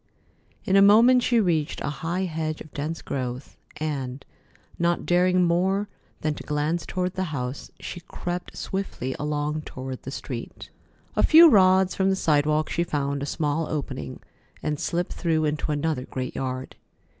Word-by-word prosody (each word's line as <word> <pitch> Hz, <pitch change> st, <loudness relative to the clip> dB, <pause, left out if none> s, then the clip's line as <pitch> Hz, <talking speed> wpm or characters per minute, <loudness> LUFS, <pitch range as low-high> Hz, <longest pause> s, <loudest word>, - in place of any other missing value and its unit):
In 190 Hz, -, +2 dB
a 195 Hz, -, +7 dB
moment 230 Hz, +5 st, +7 dB
she 240 Hz, -1 st, +3 dB
reached 165 Hz, -7 st, 0 dB
a 150 Hz, -, -2 dB
high 170 Hz, +3 st, -1 dB
hedge 160 Hz, -3 st, -3 dB
of 155 Hz, -, -12 dB
dense 155 Hz, +3 st, -4 dB
growth, 130 Hz, 0 st, -4 dB, 0.2 s
and, 135 Hz, -4 st, -4 dB, 0.5 s
not 170 Hz, 0 st, +1 dB
daring 180 Hz, +1 st, +3 dB
more 190 Hz, +4 st, +1 dB, 0.3 s
than 155 Hz, -1 st, 0 dB
to -, -, -9 dB
glance 150 Hz, +3 st, -1 dB
toward 185 Hz, 0 st, -2 dB
the 190 Hz, 0 st, -1 dB
house, 135 Hz, -4 st, -4 dB
she 175 Hz, -, -6 dB
crept 175 Hz, +1 st, -6 dB
swiftly 190 Hz, -9 st, -3 dB
along 150 Hz, +1 st, -1 dB
toward 130 Hz, -3 st, -7 dB
the -, -, -7 dB
street. 125 Hz, -3 st, -7 dB, 0.4 s
A -, -, +3 dB
few 325 Hz, 0 st, +8 dB
rods 190 Hz, -2 st, +5 dB
from 190 Hz, 0 st, +1 dB
the 190 Hz, -, +2 dB
sidewalk 155 Hz, -2 st, +2 dB
she 170 Hz, -, 0 dB
found 140 Hz, -3 st, -2 dB
a 140 Hz, -, -3 dB
small 155 Hz, +1 st, -1 dB
opening 75 Hz, -, -5 dB, 0.4 s
and 150 Hz, -1 st, -1 dB
slipped 175 Hz, +1 st, -1 dB
through 160 Hz, -3 st, 0 dB
into 150 Hz, +1 st, -1 dB
another 145 Hz, -3 st, -1 dB
great 130 Hz, -2 st, -4 dB
yard. 130 Hz, 0 st, -4 dB
155 Hz, 160 wpm, -25 LUFS, 145-180 Hz, 0.5 s, few